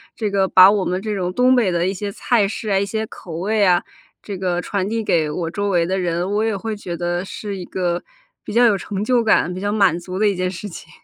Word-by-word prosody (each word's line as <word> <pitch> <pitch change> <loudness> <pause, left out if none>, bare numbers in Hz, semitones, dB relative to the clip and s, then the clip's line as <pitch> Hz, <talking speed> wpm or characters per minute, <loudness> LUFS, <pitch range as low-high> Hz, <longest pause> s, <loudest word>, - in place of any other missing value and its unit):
这 215 -3 -2
个 195 -1 +2
把 185 +1 +8
我 205 -2 0
们 180 +1 -1
这 215 0 -3
种 180 -2 -2
东 250 +4 +4
北 235 -6 +3
的 170 0 0
一 190 - 0
些 200 +1 -4
菜 215 0 +1
式 215 +1 -5
啊、 195 -1 +3
一 200 - 0
些 220 +2 -3
口 175 - -10
味 205 +5 0
啊， 180 -2 +3 0.4
这 200 -3 -6
个 180 -1 -1
传 195 +1 -2
递 225 +1 -2
给 160 -6 +1
我 165 +2 -3
周 205 +2 -2
围 175 -3 +2
的 190 +2 -1
人。 175 +1 -1
我 210 +1 +1
也 220 -2 0
会 215 +2 -4
觉 180 -4 -5
得 175 +1 -2
是 200 0 -6
一 180 - -6
个 175 -1 -2 0.4
比 - - -7
较 240 +2 +4
有 215 -4 +4
成 200 +1 -4
就 245 +2 +2
感、 215 -5 +2
比 185 - -6
较 205 +2 -2
满 195 -5 +3
足 180 +1 -7
的 215 +2 +3
一 - - 0
件 185 0 -1
事 190 +3 -7
情。 165 -3 -11
195 Hz, 290 characters per minute, -20 LUFS, 180-210 Hz, 0.4 s, 把